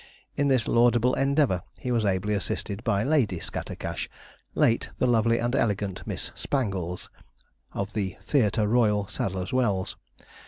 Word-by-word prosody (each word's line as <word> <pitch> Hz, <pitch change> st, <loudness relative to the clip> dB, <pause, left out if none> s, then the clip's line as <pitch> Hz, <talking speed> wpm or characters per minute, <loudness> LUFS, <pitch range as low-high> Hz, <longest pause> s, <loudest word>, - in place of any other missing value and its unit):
In 145 Hz, -, +1 dB
this 130 Hz, -4 st, +2 dB
laudable 120 Hz, +1 st, +4 dB
endeavour 135 Hz, -, +2 dB, 0.2 s
he 125 Hz, -, -3 dB
was 115 Hz, -3 st, +1 dB
ably 100 Hz, +2 st, +1 dB
assisted 100 Hz, +1 st, -2 dB
by 105 Hz, -4 st, +1 dB
Lady 120 Hz, -, +2 dB
Scattercash, -, -, -5 dB, 0.5 s
late 115 Hz, -, +2 dB
the -, -, +2 dB
lovely 115 Hz, -1 st, +3 dB
and 120 Hz, +2 st, 0 dB
elegant 100 Hz, -6 st, -1 dB
Miss -, -, -3 dB
Spangles, 95 Hz, -, -2 dB, 0.6 s
of 100 Hz, +1 st, -3 dB
the 95 Hz, -4 st, -2 dB
'Theatre 110 Hz, -6 st, +2 dB
Royal, 105 Hz, -3 st, +3 dB
Sadler's 95 Hz, +3 st, -3 dB
Wells.' 105 Hz, -8 st, +1 dB
110 Hz, 135 wpm, -27 LUFS, 100-125 Hz, 0.6 s, laudable